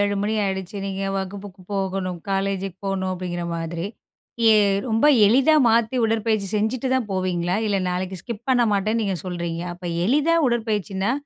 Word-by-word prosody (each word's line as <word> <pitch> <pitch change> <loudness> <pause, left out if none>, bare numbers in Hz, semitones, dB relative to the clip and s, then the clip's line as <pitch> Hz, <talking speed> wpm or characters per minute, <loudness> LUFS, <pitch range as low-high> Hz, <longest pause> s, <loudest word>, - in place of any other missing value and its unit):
AM 205 0 +2
மணி 205 +2 -1
ஆயிடுச்சு. 190 0 -3
நீங்க 195 0 -4
வகுப்புக்கு 195 0 -6
போகணும், 190 -2 -2
காலேஜுக்கு 195 -1 -2
போணும், 190 -1 -1
அப்படிங்கிற 175 -1 -4
மாதிரி. 165 +2 -4 0.6
எ - - +7 0.4
ரொம்ப 225 +5 +3 0.2
எளிதா 265 +8 +5
மாத்தி, 230 +2 +2
உடற்பயிற்சி 220 -2 0
செஞ்சுட்டு 230 +5 -1
தான் 245 -5 0
போவீங்களா? 180 -1 0
இல்ல, 200 -1 +1
நாளைக்கு 185 0 -3
ஸ்கிப் 235 0 -7
பண்ண 245 -2 +4
மாட்டேன்னு, 215 +3 0
நீங்க 195 -3 -1
சொல்றீங்க! 170 -2 -4
அப்ப, 180 +1 -15 0.2
எளிதா 300 +7 +3
உடற்பயிற்சின்னா, 210 -3 -1
195 Hz, 150 wpm, -23 LUFS, 185-220 Hz, 0.6 s, எ